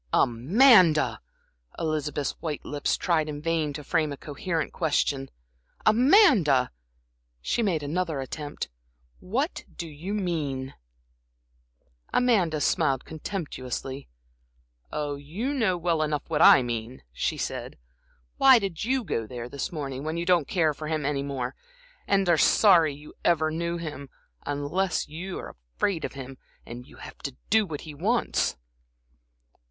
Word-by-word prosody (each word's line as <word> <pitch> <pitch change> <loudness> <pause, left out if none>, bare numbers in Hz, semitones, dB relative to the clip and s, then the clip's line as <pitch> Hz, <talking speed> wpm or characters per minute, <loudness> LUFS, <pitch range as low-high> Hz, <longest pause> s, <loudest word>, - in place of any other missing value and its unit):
"Amanda!" 170 - +5 0.6
Elizabeth's 150 -3 -1
white 155 -3 -4
lips 145 -1 -1
tried 160 -3 +1
in 145 -1 -5
vain 160 -1 0
to 150 +1 -7
frame 155 +1 0
a 140 - -5
coherent 155 +2 -3
question. 145 -4 0 0.6
"Amanda," 220 - +5 0.7
she 65 - -1
made 175 -9 0
another 160 0 -2
attempt 145 +2 -5 0.5
"what 260 - -2
do 170 - -5
you 165 +7 -5
mean?" 145 -9 -2 1.4
Amanda 195 -11 +2
smiled 135 -1 +1
contemptuously. 140 - -5 0.8
"Oh, 145 -1 -3
you 185 - -4
know 220 -10 +1
well 170 -2 0
enough 150 -2 -1
what 155 0 +1
I 130 - +8
mean," 120 +1 -5
she - - -1
said. - - -4 0.6
"Why 265 -2 +8
did 195 -7 -3
you 255 +2 0
go 115 - -2
there 120 +1 -6
this 140 +2 -4
morning 140 -4 -5
when 160 +2 -3
you 170 - -2
don't 175 -5 +3
care 160 -5 +2
for 155 +1 -7
him 155 -2 -1
any 140 -1 0
more, 135 -3 -3 0.5
and 195 -1 +2
are 170 -2 +4
sorry 170 -8 +5
you 150 +1 -13
ever 160 -2 +2
knew 170 +1 -2
him, 150 -4 -7 0.4
unless 150 +6 -1
you're 175 +5 -7 0.2
afraid 185 -5 0
of - - -4
him, 135 -1 -9 0.3
and 120 +2 -9
have - - -11
to 140 -3 -6
do 215 -1 +4
what 150 -4 -5
he 155 - -9
wants?" 210 +11 0
155 Hz, 135 wpm, -26 LUFS, 140-180 Hz, 1.4 s, I